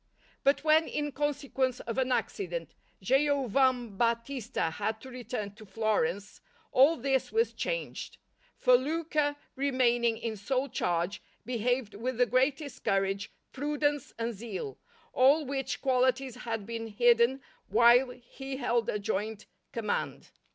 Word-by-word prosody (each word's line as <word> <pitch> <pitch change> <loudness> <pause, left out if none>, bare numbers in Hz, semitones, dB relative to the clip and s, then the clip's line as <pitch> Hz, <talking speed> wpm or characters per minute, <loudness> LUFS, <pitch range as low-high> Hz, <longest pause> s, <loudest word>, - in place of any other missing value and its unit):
But 275 +2 +3
when, 315 +1 +4
in 295 -1 -2
consequence 275 -3 -1
of 230 +2 -3
an 260 0 +1
accident, 405 - -2 0.3
Giovambattista 250 - +1
had 215 +5 -2
to 260 - -10
return 240 -5 -5
to 220 +1 -14
Florence, 200 -2 -1 0.3
all 275 +6 +6
this 270 0 0
was 455 +1 +2
changed; - - -4 0.4
for 250 - +5
Luca, 300 +2 0 0.2
remaining 240 -4 +2
in 220 -2 -4
sole 260 +7 -1
charge, 175 0 -1 0.2
behaved 245 -1 -1
with 240 +4 -3
the 245 - +5
greatest 270 +3 0
courage, 195 +1 0 0.2
prudence, 290 +1 -1
and 230 +1 -2
zeal, 225 - -6 0.3
all 280 +4 +5
which 270 0 -3
qualities 260 0 +2
had 225 -4 -4
been 230 0 -5
hidden 235 +3 +4 0.3
while 240 +2 +6
he 265 +2 -8
held 240 -3 0
a - - 0
joint 205 +1 -3 0.3
command. 220 -3 -3
250 Hz, 125 wpm, -30 LUFS, 225-275 Hz, 0.4 s, all